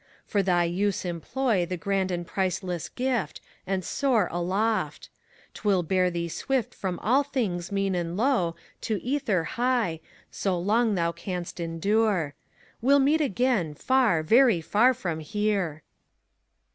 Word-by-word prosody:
For 205 - +1
thy 180 -2 +2
use 190 +3 -1
employ 180 +3 -1
The 180 0 -3
grand 195 0 0
and 175 -1 -3
priceless 180 -2 -2
gift, 250 -4 -2 0.3
and 190 -1 -1
soar 245 -9 +1
aloft 185 -1 -1
I - - -31
'T - - -11
will 195 -4 +3
bear 185 +2 +2
thee 170 -1 -3
swift 250 +7 -2
from 185 -3 -3
all 255 +7 +4
things 215 -12 -2
mean 195 -1 0
and 175 0 -2
low 215 -9 +1 0.3
To 215 -3 0
ether 240 - 0
high, 235 -6 0 0.3
so 190 -3 -1
long 215 +4 +2
thou 170 -2 +1
canst 175 +1 -6
endure. 170 0 0 0.5
Well 275 +4 +5
meet 290 +3 +3
again, 240 - +1
far, 240 - +2
very 230 +2 +5
far 225 +10 +3
from 170 -7 -3
here. 185 -2 -1
195 Hz, 145 wpm, -26 LUFS, 175-235 Hz, 0.5 s, Well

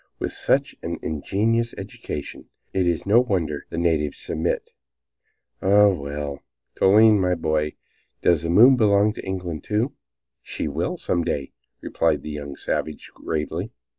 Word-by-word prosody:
with - - -3
such - - +1
an - - -4
ingenious 110 +9 0
education - - -7 0.3
it 95 -2 +1
is 85 -2 0
no 105 +4 +5
wonder 85 - -2
the - - -6
natives 80 -4 0
submit. 80 +2 -2 0.9
Ah, 100 +2 +6
well, 70 -4 -4 0.3
Toline, 105 +2 +5
my 90 -1 +2
boy, 75 -2 -1 0.5
does 85 -4 +4
the 85 - -3
moon 120 +10 +7
belong 105 -2 +3
to - - -8
England, 90 -4 -4
too?" 110 +5 -1 0.5
"She - - -4
will, - - -2
some 85 -1 -1
day," 70 -3 -3 0.3
replied 80 -4 0
the 75 - -6
young 70 -1 -6
savage, 75 -1 -4
gravely. 75 -1 -4
85 Hz, 140 wpm, -23 LUFS, 75-105 Hz, 0.9 s, moon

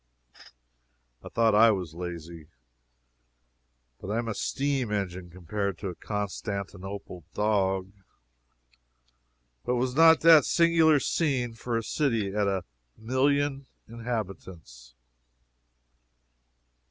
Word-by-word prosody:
I - - -8
thought 115 -1 +2
I 115 +2 +7
was 90 -7 -2
lazy, 85 -2 -8 1.5
but 95 - -8
I 110 - -1
am 120 0 -2
a 115 - -2
steam 135 -1 -2
engine 95 -3 -3
compared 95 +2 -4
to 100 - -5
a 90 - -7
Constantinople 100 -2 -5
dog. 95 -3 0 1.7
But 125 - 0
was 125 +1 -1
not 160 +2 +6
that 165 -1 +8
a - - -3
singular 165 -2 +4
scene 130 -5 -1
for 115 +1 -3
a 115 - -2
city 115 -8 -1
of 105 -1 +1
a 95 -2 -1 0.3
million 135 +3 0 0.2
inhabitants? 95 - -7
105 Hz, 105 wpm, -27 LUFS, 95-130 Hz, 1.7 s, that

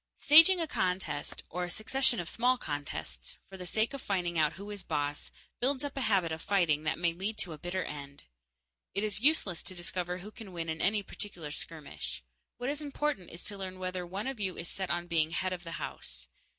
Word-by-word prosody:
Staging 330 +5 +9
a 330 - +1
contest 180 - -1
or 180 +2 -3
a - - -6
succession 245 +5 +2
of 170 - -3
small 250 +7 +3
contests, 145 - -5
for 195 - -10
the 180 -1 -7
sake 220 +7 +1
of 275 - -5
finding 180 -3 -1
out 155 -2 +3
who 200 +2 -8
is 205 -2 -5
boss 145 -4 -2 0.3
builds 265 +2 +1
up 285 -1 -4
a 270 - -1
habit 195 -8 +3
of 160 0 -3
fighting 165 -6 +2
that 155 - +1
may 170 -1 +2
lead 200 +5 -2
to 170 - -3
a 150 - -10
bitter 180 +3 -2
end. 140 -1 -7 0.7
It 200 - +2
is 210 -1 0
useless 245 - +4
to 185 - -6
discover 180 0 -2
who 195 +4 -9
can 215 -5 -10
win 165 -1 -3
in 160 0 -2
any 205 +1 +3
particular 175 -7 -6
skirmish. 100 - -5 0.3
What 250 +3 -1
is 295 +1 -1
important 290 - -1
is 170 - -7
to 205 - -1
learn 185 -1 -5
whether 185 -1 -3
one 190 +4 -4
of 265 -3 -3
you 190 -3 -1
is 170 - -5
set 190 -1 -3
on 175 0 0
being 165 -2 +2
"head 185 +2 -1
of 175 -1 -6
the 165 -1 -6
house." 65 - -5
185 Hz, 220 wpm, -32 LUFS, 165-215 Hz, 0.7 s, Staging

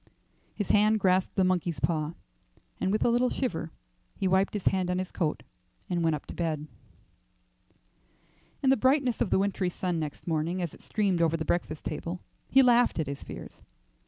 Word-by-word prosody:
His 205 - -1
hand 215 +1 +4
grasped 185 -1 +2
the 190 - +3
monkey's 180 -3 0
paw, 160 -1 -1 0.6
and 190 - 0
with 215 - +1
a - - +5
little 245 +1 +3
shiver 165 -11 -2 0.5
he 195 - -1
wiped 190 +3 +2
his 205 - -3
hand 185 -2 +2
on 180 - 0
his 185 0 -3
coat 155 -4 -1 0.5
and 175 -1 +1
went 160 -1 +2
up 145 - -8
to - - -8
bed. 160 -3 -1
II. 150 - -9 2.0
In 265 - +4
the 270 - +4
brightness 260 0 +2
of - - +2
the - - +3
wintry 195 -1 0
sun 180 -1 -2
next 150 -2 -5
morning 165 +2 -1
as 175 -4 -3
it - - -15
streamed 195 -5 0
over 165 0 +2
the 160 - -3
breakfast 160 -2 -2
table 170 +3 -4 0.3
he 270 - +6
laughed 245 -1 +4
at 160 - 0
his 140 0 -6
fears. - - -9
180 Hz, 190 wpm, -28 LUFS, 165-205 Hz, 2.0 s, he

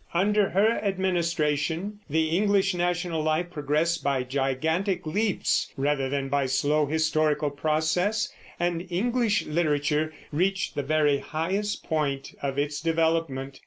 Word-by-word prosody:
Under 205 +3 +3
her 215 +5 +2
administration 175 -1 0
the 160 +2 +1
English 200 0 +2
national 175 -2 -1
life 155 +3 0
progressed 155 +1 0
by 140 -2 +1
gigantic 160 +8 -1
leaps 205 +6 0
rather 135 -1 0
than 140 0 -1
by 140 -1 +1
slow 145 +3 +2
historical 155 -1 +1
process, 160 +8 0 0.3
and 175 +1 -1
English 230 +3 +1
literature 150 -1 0 0.2
reached 185 +5 0
the - - -1
very 145 0 +2
highest 190 +8 -2
point 145 -4 -2
of 135 -1 -2
its 145 0 -1
development. 160 -5 0
160 Hz, 125 wpm, -26 LUFS, 145-180 Hz, 0.3 s, Under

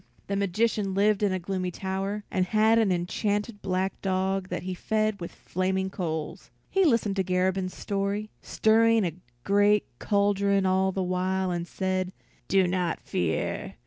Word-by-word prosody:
The 200 - -2
magician 200 0 0
lived 205 +1 +3
in 205 -2 +2
a 185 - 0
gloomy 185 0 -3
tower, 195 +3 -3
and 185 -1 +1
had 220 +2 +4
an 215 -4 +3
enchanted 205 +4 -1
black 190 0 -2
dog 190 0 0
that - - -4
he 185 0 -3
fed 215 +2 -1
with 170 - -5
flaming 190 +1 -2
coals. 160 -5 -4 0.2
He 385 0 +3
listened 230 -8 +2
to 190 - +2
Garabin's 185 +1 0
story, 200 +1 -2
stirring 225 -1 +3
a 170 - -2 0.3
great 205 +1 +3
cauldron 200 -1 +2
all 190 +1 +2
the 190 0 -2
while, 185 +1 0
and 175 0 -3
said, 185 0 -2 0.3
"Do 190 -1 +4
not 180 -1 -1
fear. 80 -2 -2
190 Hz, 155 wpm, -27 LUFS, 185-205 Hz, 0.3 s, had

